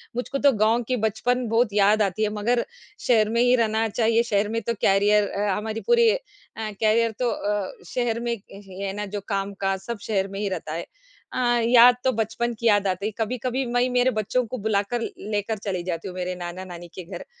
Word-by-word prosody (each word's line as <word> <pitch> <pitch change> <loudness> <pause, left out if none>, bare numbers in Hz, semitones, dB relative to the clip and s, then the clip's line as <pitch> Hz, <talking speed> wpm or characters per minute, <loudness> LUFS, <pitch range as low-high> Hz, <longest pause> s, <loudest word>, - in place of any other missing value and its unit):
मुझको 250 +3 -2
तो 280 0 +5
गाँव 225 +1 +2
की 255 - +1
बचपन 245 +3 0
बहुत 225 -1 +2
याद 210 +1 +4
आती 200 +1 0
है 215 - +2
मगर 235 +3 0 0.4
शहर 220 -4 +4
में 235 +1 +1
ही 245 +1 +5
रहना 225 -1 +1
चाहिए, 230 +1 +2
शहर 205 -2 0
में 230 +1 -1
तो 235 - -2
करियर 205 +1 +4
अ, 205 0 -1
हमारी 220 +1 -4
पूरी 470 -1 +5
अ, - - +1 0.4
करियर 220 +1 +1
तो 250 -1 +1
अ, 205 -2 -2 0.2
शहर 240 -2 -1
में 235 0 -2
य 200 -2 -10
ही 185 - -9
है 195 - -2
ना, 205 0 -4
जो 205 +1 -5
काम-काज 195 -1 -2
सब 235 +4 -5
शहर 195 -3 -1
में 195 - -5
ही 205 - -1
रहता 165 -4 -4
है। 165 - -3 0.5
अ, - - -2 0.3
याद 245 0 +8
तो 260 - +3
बचपन 225 +2 -1
की 235 - +1
याद 205 -2 +4
आती 190 +2 -2
है, 220 - -1
कभी-कभी 250 +3 -2
मैं 245 +1 +2
मेरे 250 +1 +3
बच्चों 220 +3 0
को 255 - -5
बुलाकर 215 +2 -1
लेकर 215 -1 -3
चली 185 -4 -2
जाती 175 0 -4
हूँ, 180 - -7
मेरे 180 0 -3
नाना-नानी 175 0 -7
के 185 - -6
घर, 175 +1 -8
215 Hz, 215 wpm, -24 LUFS, 200-235 Hz, 0.5 s, याद